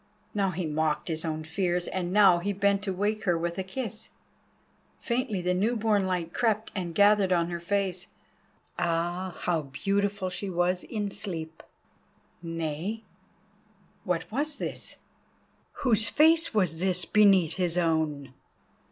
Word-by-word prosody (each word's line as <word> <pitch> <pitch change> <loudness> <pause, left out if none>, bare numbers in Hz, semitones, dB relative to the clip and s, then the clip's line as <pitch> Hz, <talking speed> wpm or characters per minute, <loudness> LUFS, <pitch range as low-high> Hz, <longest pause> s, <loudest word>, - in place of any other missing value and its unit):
Now 200 -2 +1
he 180 -1 -3
mocked 155 +1 -1
his 160 -1 -2
own 155 -1 -3
fears, 175 +2 -1
and 180 -2 -3
now 195 -3 +6
he 200 +4 -2
bent 200 0 +2
to 195 - -1
wake 210 +3 -1
her 175 -3 +2
with 170 +2 -3
a - - -1
kiss. 220 +2 -5 0.9
Faintly 235 -6 -2
the 180 +1 +1
new 210 +7 +1
born 210 -3 +1
light 175 -2 -2
crept 220 -2 0
and 175 -5 -4
gathered 205 -1 +4
on 170 -1 +2
her 170 - -3
face; 185 0 -2 0.7
ah! 175 +2 -1
how 170 -3 +1
beautiful 195 +7 -1
she 185 +2 -4
was 180 0 0
in 210 -3 -3
sleep. 165 -6 -6 0.8
Nay, 165 +6 -4 1.0
what - - -2
was 290 +5 0
this? - - -5 0.9
Whose 225 -3 +5
face 325 +2 +4
was 185 -7 +1
this 185 0 +1
beneath 195 -6 +4
his 180 -2 0
own? 155 -5 0
185 Hz, 145 wpm, -28 LUFS, 170-205 Hz, 1.0 s, now